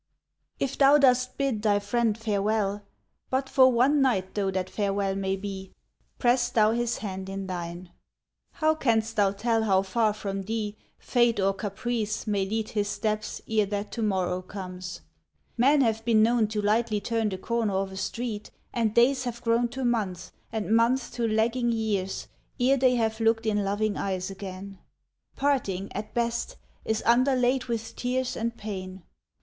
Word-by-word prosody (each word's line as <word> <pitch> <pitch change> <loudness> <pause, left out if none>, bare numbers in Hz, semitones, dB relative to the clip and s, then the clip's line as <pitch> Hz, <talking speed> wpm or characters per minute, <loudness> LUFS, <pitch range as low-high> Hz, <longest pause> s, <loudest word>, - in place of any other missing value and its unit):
If 275 -1 -2
thou 280 +1 +7
dost 255 -2 +3
bid 270 -6 0
thy 210 -2 +3
friend 215 +2 0
farewell, 210 -1 0 0.5
But 265 +1 0
for 260 -1 +5
one 265 +5 +3
night 195 -8 +1
though 200 -2 0
that 185 -1 -2
farewell 200 -1 -1
may 195 0 -1
be, 195 -1 -7 0.4
Press 245 0 +2
thou 215 -1 +3
his 240 0 0
hand 190 -2 -5
in 195 0 -4
thine. 175 -1 -6 0.6
How 315 -1 +2
canst 225 -7 0
thou 200 -2 +3
tell 225 +3 0
how 195 -3 +3
far 215 +2 +1
from 195 -2 -4
thee 210 +1 -3 0.2
Fate 240 -3 +2
or 195 0 +2
caprice 215 +2 -3
may 200 -3 0
lead 220 +1 -2
his 205 -1 -1
steps 215 0 -2
ere 215 -2 +2
that 205 +1 -3
to 230 - -4
morrow 185 -4 0
comes? 185 -1 -7 0.5
Men 275 +4 +4
have 225 -3 +1
been 225 -2 +4
known 230 -1 +3
to 210 -1 -3
lightly 215 +1 +2
turn 225 0 -1
the 190 - -4
corner 225 0 -1
of 190 0 -1
a - - -8
street, 225 0 -4 0.2
And 225 -3 0
days 255 +2 +4
have 235 0 -5
grown 235 +1 +2
to 260 +2 -4
months, 210 -7 -1 0.2
and 220 0 0
months 235 +3 +2
to 235 -1 -1
lagging 230 +3 +1
years, 210 -4 -2 0.3
Ere 260 +3 +4
they 255 -1 +4
have 220 -1 0
looked 225 0 +2
in 210 -2 +1
loving 205 +2 0
eyes 190 -1 -2
again. 195 0 -8 0.6
Parting, 205 -9 0
at 210 +2 -6
best, 235 - -1 0.3
is 220 0 -1
underlaid 255 +1 +3
With 230 -2 -4
tears 255 0 -1
and 230 +1 -3
pain. 190 -3 -6
220 Hz, 165 wpm, -27 LUFS, 195-240 Hz, 0.6 s, thou